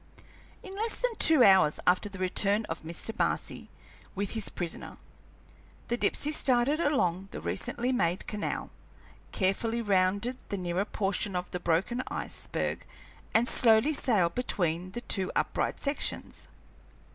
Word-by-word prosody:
In 385 Hz, 0 st, -8 dB
less 445 Hz, +3 st, +1 dB
than -, -, -1 dB
two 315 Hz, -6 st, +7 dB
hours 190 Hz, -7 st, +5 dB
after 185 Hz, +3 st, +2 dB
the 195 Hz, -, -9 dB
return 200 Hz, +3 st, +1 dB
of 160 Hz, -, -6 dB
Mr. 170 Hz, +7 st, -3 dB
Marcy -, -, -2 dB, 0.5 s
with 200 Hz, 0 st, -3 dB
his 220 Hz, -2 st, 0 dB
prisoner, 175 Hz, -2 st, -6 dB, 0.9 s
the 240 Hz, -, +1 dB
Dipsey 295 Hz, +4 st, +1 dB
started 265 Hz, +1 st, +2 dB
along 195 Hz, -, 0 dB
the -, -, -7 dB
recently 245 Hz, +1 st, -2 dB
made 180 Hz, -7 st, 0 dB
canal, 210 Hz, -1 st, -4 dB, 0.6 s
carefully 220 Hz, +4 st, 0 dB
rounded 200 Hz, +4 st, +1 dB
the 200 Hz, -, -3 dB
nearer 180 Hz, +1 st, -2 dB
portion 195 Hz, -1 st, -2 dB
of 180 Hz, 0 st, -3 dB
the 180 Hz, -, -3 dB
broken 175 Hz, +9 st, 0 dB
iceberg, -, -, -3 dB, 0.5 s
and 230 Hz, +2 st, +4 dB
slowly 230 Hz, +6 st, +5 dB
sailed 210 Hz, -, +2 dB
between 180 Hz, -7 st, -1 dB
the 240 Hz, -, -5 dB
two 190 Hz, -5 st, +1 dB
upright -, -, -1 dB
sections. 280 Hz, 0 st, -2 dB
205 Hz, 135 wpm, -29 LUFS, 185-245 Hz, 0.9 s, two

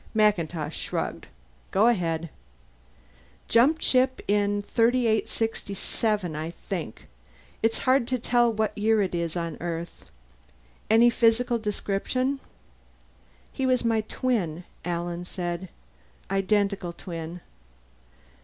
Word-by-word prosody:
MacIntosh 170 Hz, -7 st, +1 dB
shrugged. -, -, -3 dB, 0.4 s
"Go 200 Hz, +3 st, +3 dB
ahead." 170 Hz, -8 st, +1 dB, 1.2 s
"Jumped 280 Hz, +8 st, +4 dB
ship 255 Hz, 0 st, +3 dB
in 205 Hz, 0 st, +2 dB
3867 220 Hz, -5 st, 0 dB
I 155 Hz, +2 st, -3 dB, 0.2 s
think. 170 Hz, -, -4 dB, 0.6 s
It's 225 Hz, 0 st, +2 dB
so -, -, -6 dB
hard 255 Hz, -2 st, +3 dB
to 255 Hz, -, 0 dB
tell 240 Hz, 0 st, +3 dB
what 220 Hz, -1 st, -1 dB
year 215 Hz, 0 st, +3 dB
it 185 Hz, -, -3 dB
is 170 Hz, 0 st, -2 dB
on 170 Hz, -2 st, -3 dB
Earth." 170 Hz, 0 st, -5 dB, 0.8 s
"And 235 Hz, +2 st, +6 dB
physical 235 Hz, +1 st, +3 dB
description?" 220 Hz, +6 st, -1 dB, 1.1 s
"He 265 Hz, -, -1 dB
was 255 Hz, -2 st, +2 dB
my 225 Hz, -1 st, +3 dB
twin," 210 Hz, -8 st, -1 dB, 0.2 s
Alan 175 Hz, 0 st, -3 dB
said. 175 Hz, 0 st, -4 dB, 0.6 s
"Identical 195 Hz, -2 st, +1 dB
twin." 170 Hz, -1 st, -7 dB
205 Hz, 105 wpm, -26 LUFS, 175-230 Hz, 1.2 s, And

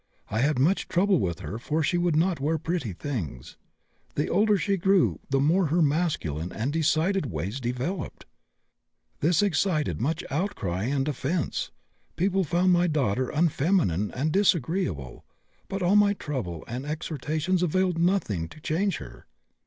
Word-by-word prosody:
I 110 Hz, -, 0 dB
had 145 Hz, +2 st, +2 dB
much 160 Hz, +10 st, +2 dB
trouble 185 Hz, 0 st, +2 dB
with 85 Hz, -1 st, -2 dB
her 105 Hz, +4 st, -5 dB
for 155 Hz, +6 st, -1 dB
she 175 Hz, +4 st, +1 dB
would 175 Hz, -2 st, +1 dB
not 170 Hz, +1 st, +2 dB
wear 155 Hz, +4 st, 0 dB
pretty 160 Hz, -, -2 dB
things. 90 Hz, -, -5 dB, 0.6 s
The 150 Hz, -, 0 dB
older 210 Hz, +2 st, +3 dB
she 200 Hz, +1 st, 0 dB
grew 190 Hz, 0 st, +2 dB
the 135 Hz, 0 st, +2 dB
more 165 Hz, +6 st, +3 dB
her 165 Hz, +3 st, +2 dB
masculine 140 Hz, -, -1 dB
and 125 Hz, +6 st, -2 dB
decided 165 Hz, +2 st, +1 dB
ways 95 Hz, -, -4 dB
developed. 125 Hz, +9 st, -4 dB, 0.9 s
This 165 Hz, +5 st, +3 dB
excited 160 Hz, -, 0 dB
much 160 Hz, +7 st, -1 dB
outcry 115 Hz, -, -2 dB
and 135 Hz, +2 st, 0 dB
offence. 150 Hz, +4 st, -2 dB, 0.5 s
People 190 Hz, +2 st, +1 dB
found 180 Hz, +3 st, +2 dB
my 175 Hz, 0 st, +3 dB
daughter 130 Hz, -6 st, 0 dB
unfeminine 150 Hz, -, +1 dB
and 145 Hz, +5 st, 0 dB
disagreeable, 160 Hz, -, 0 dB, 0.4 s
but 195 Hz, -1 st, -3 dB
all 180 Hz, +3 st, +3 dB
my 205 Hz, -1 st, +5 dB
trouble 115 Hz, -, -4 dB
and 125 Hz, +3 st, -4 dB
exhortations 155 Hz, +3 st, -2 dB
availed 180 Hz, 0 st, +1 dB
nothing 170 Hz, -, +1 dB
to -, -, -13 dB
change 175 Hz, +5 st, 0 dB
her." -, -, -11 dB
155 Hz, 150 wpm, -26 LUFS, 125-180 Hz, 0.9 s, my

